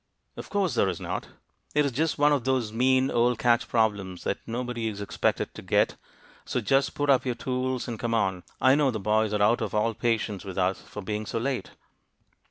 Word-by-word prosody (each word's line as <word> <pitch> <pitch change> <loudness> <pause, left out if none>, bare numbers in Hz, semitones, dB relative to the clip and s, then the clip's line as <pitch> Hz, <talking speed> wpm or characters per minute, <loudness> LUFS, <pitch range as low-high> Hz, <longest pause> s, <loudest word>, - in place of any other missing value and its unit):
"Of - - -8
course 195 -7 0
there 100 -4 +2
is 90 - -4
not! - - -4 0.5
It 150 0 +4
is 140 - 0
just 155 +6 0
one 145 0 +4
of 140 -4 0
those 125 -4 0
mean 130 +3 +3
old 120 0 +2
catch 120 -1 +2
problems 100 -6 0
that - - -1
nobody 120 -1 -3
is 105 -2 -4
expected 100 - -1
to - - -9
get - - +2 0.5
So - - -2
just 135 +4 +1
put 145 -1 +2
up 130 -2 +4
your 125 -2 -1
tools, 130 +1 -2
and 115 -3 -5
come 115 -1 -1
on. 95 -5 0 0.2
I 130 - +5
know 145 -1 +3
the 110 -4 -2
boys 110 +1 +1
are 105 -1 +1
out 115 +3 +3
of 110 -2 -3
all 115 +2 +2
patience 110 -3 -1
with 95 -1 -7
us 95 0 +1
for 105 - -9
being 105 +2 -3
so - - -3
late." 130 +2 -2
115 Hz, 215 wpm, -27 LUFS, 105-130 Hz, 0.5 s, I